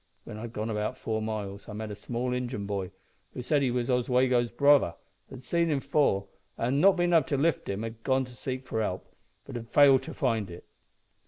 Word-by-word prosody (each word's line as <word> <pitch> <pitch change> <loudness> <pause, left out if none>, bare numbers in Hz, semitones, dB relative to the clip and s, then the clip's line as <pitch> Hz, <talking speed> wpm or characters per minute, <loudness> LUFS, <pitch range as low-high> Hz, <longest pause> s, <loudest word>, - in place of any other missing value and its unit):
When 105 - -8
I'd 115 +1 -6
gone 110 0 -3
about 105 +4 -2
four 110 -2 -2
miles 105 -2 -5
I - - -6
met 110 0 -5
a - - -5
small 125 +3 -3
Injin 125 -4 -3
boy 100 -2 -3 0.5
who 125 - -5
said 145 +3 +2
he 135 - +2
was 120 -1 -1
Oswego's 125 -1 +2
brother, 140 - +4 0.3
had 130 -1 -10
seen 170 +3 +1
him 145 -3 +1
fall, 135 -9 +1 0.3
an', 130 +5 +1
not 195 +1 +6
bein' 175 0 +2
able 160 -5 +5
to 140 - 0
lift 155 +1 0
him, 100 +2 -3
had 115 0 -7
gone 130 +2 +1
to 125 -1 -13
seek 130 +3 -5
for 110 -3 -2
help, 95 -3 -4 0.3
but 135 - -9
had 115 -1 -6
failed 140 -1 +6
to - - -8
find 110 -4 0
it. 85 0 -10
125 Hz, 220 wpm, -28 LUFS, 110-135 Hz, 0.5 s, not